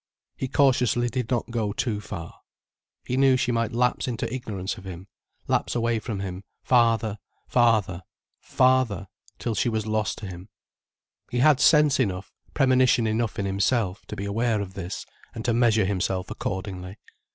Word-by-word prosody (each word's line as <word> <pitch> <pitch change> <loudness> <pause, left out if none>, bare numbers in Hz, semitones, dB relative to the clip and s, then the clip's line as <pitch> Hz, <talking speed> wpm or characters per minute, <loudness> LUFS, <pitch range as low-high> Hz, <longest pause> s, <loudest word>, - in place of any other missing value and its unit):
He 130 - -3
cautiously 125 -3 +2
did 125 -2 -3
not 120 -2 -1
go 110 -3 -1
too 105 -2 -2
far. 85 -5 -8 0.7
He 125 - -2
knew 135 -1 +5
she 125 -1 0
might 115 -1 0
lapse 125 +2 +1
into 120 0 -2
ignorance 105 -7 -4
of - - -14
him, 95 -1 -8 0.4
lapse - - 0
away 115 -1 +1
from 105 -3 -4
him, 95 0 -5 0.2
farther, 115 -4 +2 0.3
farther, 110 -7 +2 0.4
farther, 130 -7 +2 0.3
till 115 - -2
she 115 - +1
was 110 -2 -2
lost 110 -1 -1
to 105 - -7
him. 90 +1 -9 0.8
He 125 - -3
had 140 +2 +5
sense 150 -2 +5
enough, 95 -6 -1 0.2
premonition 130 -4 +4
enough 110 0 -1
in 100 - -1
himself, 100 0 0
to - - -6
be 100 - -4
aware 110 +2 0
of 95 -2 -5
this 95 -1 -6 0.3
and 115 - -6
to 120 - +2
measure 115 -3 +3
himself 95 -1 -1
accordingly. 95 0 -5
110 Hz, 165 wpm, -25 LUFS, 100-125 Hz, 0.8 s, knew